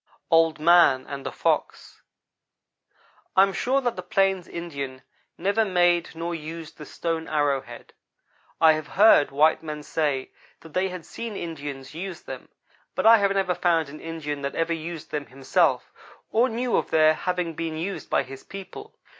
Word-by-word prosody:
OLD 165 -1 +4
MAN 155 -5 +5
AND 140 -1 -7
THE - - -4
FOX - - -2 1.3
I 190 - +7
AM 195 0 +1
sure 265 +6 +1
that 245 -3 -1
the - - -5
plains 195 -2 +1
Indian 140 -6 -6 0.3
never 200 +5 +1
made 175 -4 +2
nor 170 +1 -3
used 160 0 -8
the 150 - -9
stone 165 -1 -3
arrow 145 -3 +1
head. 120 -2 -13 0.7
I 160 -1 +7
have 155 -1 -4
heard 205 -8 +7
white 150 +3 +3
men 150 -2 -6
say 145 -4 -1 0.3
that 160 -2 -14
they 190 +1 +1
had 180 -2 -8
seen 230 -3 -6
Indians 145 -6 -6
use 175 +2 -6
them; - - -9 0.5
but - - -1
I 230 +1 +9
have 200 -2 +2
never 190 -2 +1
found 165 -5 +1
an 155 - -10
Indian 150 -3 -5
that 140 0 -4
ever 165 0 0
used 165 0 -6
them 145 -2 -3
himself, 135 +1 0 0.4
or 240 +4 +3
knew 240 +2 -1
of - - -1
their 155 0 +5
having 180 0 -2
been 160 0 -4
used 190 +5 -5
by - - +2
his 135 +1 -11
people. 195 - -10
165 Hz, 170 wpm, -25 LUFS, 150-185 Hz, 1.3 s, I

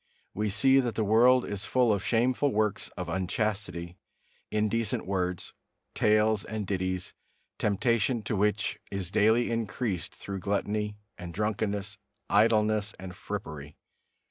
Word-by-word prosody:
We 105 +1 -1
see 130 +7 +5
that 120 -3 -1
the 110 - +1
world 120 +4 +5
is 100 0 -4
full 125 -1 +3
of 100 -2 -2
shameful 125 +6 +2
works 105 0 0
of 90 - -4
unchastity, 95 -1 -2 0.5
indecent 110 +1 0
words, 90 -2 -2 0.4
tales 105 -1 +3
and 110 -1 -4
ditties, 95 -1 -2 0.5
temptation 115 +3 +1
to 105 - -2
which 105 +1 0
is 95 -2 -4
daily 110 +3 +3
increased 115 -3 -2
through 100 -1 -6
gluttony 105 +1 -1 0.2
and 85 -2 -7
drunkenness, 105 0 -2 0.3
idleness 105 -1 +3
and 90 -1 -8
frippery. 75 -8 -7
105 Hz, 125 wpm, -29 LUFS, 95-110 Hz, 0.5 s, see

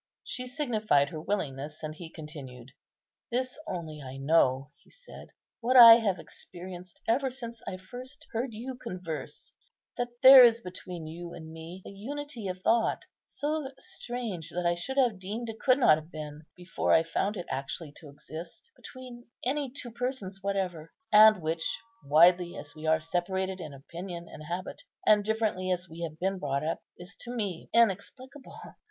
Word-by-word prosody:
She 255 -1 -6
signified 215 - +1
her 155 - -5
willingness, 150 -6 -3
and 155 0 -4
he 165 +1 -9
continued—"This 150 - -7
only 160 -4 -5
I 130 -1 -8
know," 135 -1 +2
he - - -26
said, - - -13 0.3
"what 250 +2 +3
I 230 -2 +12
have 205 -5 0
experienced 180 +1 -10
ever 265 +4 +2
since 235 -3 -7
I 185 - -4
first 255 +10 -10
heard 235 +2 -2
you 235 +4 -6
converse, 185 -10 -7 0.5
that 245 - +1 0.2
there 260 0 +12
is 235 -1 +6
between 180 -4 -8
you 170 +2 -7
and 160 -1 -9
me 165 +3 -9
a - - -8
unity 255 +2 -6
of 185 0 -5
thought 230 0 +2 0.2
so 295 -1 -2
strange 230 -11 -6
that 175 +1 -3
I 170 - +4
should 220 +11 -5
have 240 -8 +3
deemed 215 +5 -5
it 225 - -7
could 255 -1 +4
not 155 - +6
have 160 +2 -15
been, 150 0 -8
before 180 0 -2
I 160 - +6
found 195 +5 -1
it 180 - -5
actually 135 +3 -4
to 155 - -12
exist, 160 - -10
between 250 -2 -11 0.2
any 275 +1 0
two 245 -2 -8
persons 230 -6 -4
whatever; 185 -5 -2 0.2
and 215 -3 +8
which, 165 +1 -1 0.2
widely 175 +5 +5
as 145 - -7
we 155 0 -7
are 160 0 +4
separated 185 +3 -2
in 155 - -7
opinion 170 +5 -8
and 155 - -10
habit, 175 +4 -5 0.2
and 210 -1 +6
differently 215 -4 0
as 180 0 -1
we 165 +1 -10
have 160 -2 -4
been 190 +2 -1
brought 140 -2 -1
up, 165 - -1 0.2
is 180 +2 -10
to 245 0 -6
me 200 -7 -3
inexplicable. 235 +6 0
185 Hz, 170 wpm, -29 LUFS, 160-235 Hz, 0.5 s, I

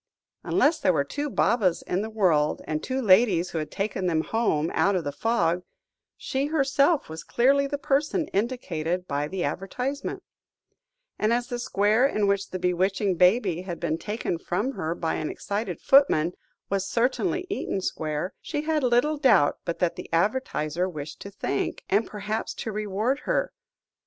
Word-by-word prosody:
Unless 315 +3 +2
there 185 - +3
were 140 - +2
two 290 - -4
Babas 205 -9 +2
in 180 - -1
the 220 - -4
world, 175 -9 +2
and 155 0 -2
two 260 0 -2
ladies 190 -5 +4
who 165 - -2
had 155 - -4
taken 195 -2 -2
them 160 -2 +1
home 170 -9 0
out 200 0 +2
of 180 - 0
the 145 - -3
fog, 175 -2 +1 0.6
she 270 +2 -2
herself 280 0 +2
was 160 +1 -7
clearly 275 +3 +3
the 285 +1 -2
person 300 +4 0
indicated 185 -6 -2
by 145 +1 -1
the 185 +2 -3
advertisement; 250 - -3 1.0
and 215 +1 +2
as 240 +1 0
the 245 - -3
square 215 +2 +3
in 215 -6 0
which 200 0 0
the 185 - -4
bewitching 185 +2 +1
baby 180 -1 +3
had 180 -2 -6
been 165 -1 -1
taken 210 -5 -3
from 205 +10 -1
her 165 -9 -3
by 165 -2 -2
an 155 - -2
excited 200 -4 -4
footman, 180 - +4 0.3
was 195 -1 -1
certainly 270 +10 0
Eaton 385 - -2
Square, 155 0 -3
she 295 -2 -3
had 310 -1 +1
little 255 +5 +2
doubt 220 - +4
but 170 - -2
that 175 -2 0
the - - -8
advertiser 175 - 0
wished 155 -2 -7
to 200 - -8
thank, 195 -8 -3
and 205 +4 +3
perhaps 210 +1 -4
to 225 - -4
reward, 215 +6 -1
her. - - 0
200 Hz, 170 wpm, -26 LUFS, 170-250 Hz, 1.0 s, ladies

